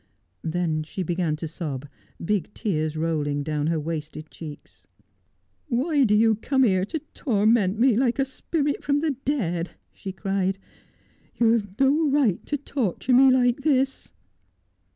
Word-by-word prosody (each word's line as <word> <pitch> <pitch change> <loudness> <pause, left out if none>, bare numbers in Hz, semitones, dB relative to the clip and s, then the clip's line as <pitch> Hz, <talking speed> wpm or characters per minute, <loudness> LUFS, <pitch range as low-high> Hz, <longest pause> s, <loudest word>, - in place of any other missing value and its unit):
Then 160 -1 -1
she 175 +5 -5
began 170 -2 -1
to 160 +1 -5
sob, 145 -4 -5 0.4
big 205 -1 0
tears 155 -7 -1
rolling 150 -3 -1
down 150 0 -1
her 165 -1 +1
wasted 155 0 -5
cheeks. 155 -3 -11 0.8
'Why 280 +2 +2
do 210 -2 +3
you 220 0 +4
come 265 +4 +1
here 190 -5 +3
to 320 - -3 0.2
torment 215 -4 +2
me, 250 +2 +4
like 240 +2 +1
a 270 - +2
spirit 285 +2 -2
from 285 0 +1
the 315 -1 +1
dead 235 - -2
V - - -21 0.2
she 195 - -7
cried. 195 0 -1 0.4
' - - -36
You 230 -1 +5
have 205 -4 -1
no 290 +3 +3
right 270 -10 +2
to 290 - -1
torture 260 -4 -1
me 265 +2 +7
like 250 0 +3
this.' 270 -2 0
210 Hz, 155 wpm, -25 LUFS, 165-265 Hz, 0.8 s, me